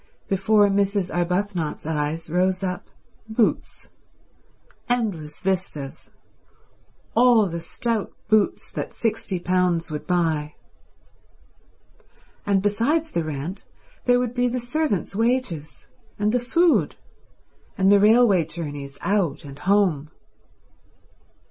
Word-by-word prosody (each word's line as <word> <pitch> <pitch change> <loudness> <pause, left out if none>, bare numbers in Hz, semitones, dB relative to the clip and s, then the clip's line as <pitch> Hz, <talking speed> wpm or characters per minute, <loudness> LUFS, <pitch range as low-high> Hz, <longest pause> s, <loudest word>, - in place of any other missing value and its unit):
Before 205 +2 +3
Mrs. 200 -1 0
Arbuthnot's 180 -2 -1
eyes 155 +1 -2
rose 185 +3 +1
up 180 -1 -3 0.4
boots: 220 0 -1 1.0
endless 190 -12 -2
vistas, 180 -7 -3 1.0
all 235 -2 +5
the 170 -1 -5
stout 225 +5 -2 0.2
boots 215 -1 +1
that - - -5
sixty 210 -5 -2
pounds 175 -2 +1
would 150 -1 -5
buy; 160 -4 0 1.9
and 195 -1 +2
besides 280 +11 +1
the 170 - -1
rent 155 +5 -5 0.4
there 245 0 +5
would 245 -1 -2
be 245 0 +1
the 250 +1 -1
servants' 245 - -1
wages 225 - -1 0.3
and 210 0 +1
the 250 - +2
food, 335 +8 +2 0.8
and 190 +1 +4
the 205 - +6
railway 210 -3 +5
journeys 145 -4 -6
out 195 -8 0
and 140 0 -10
home. 180 -8 +2
195 Hz, 105 wpm, -23 LUFS, 165-225 Hz, 1.9 s, the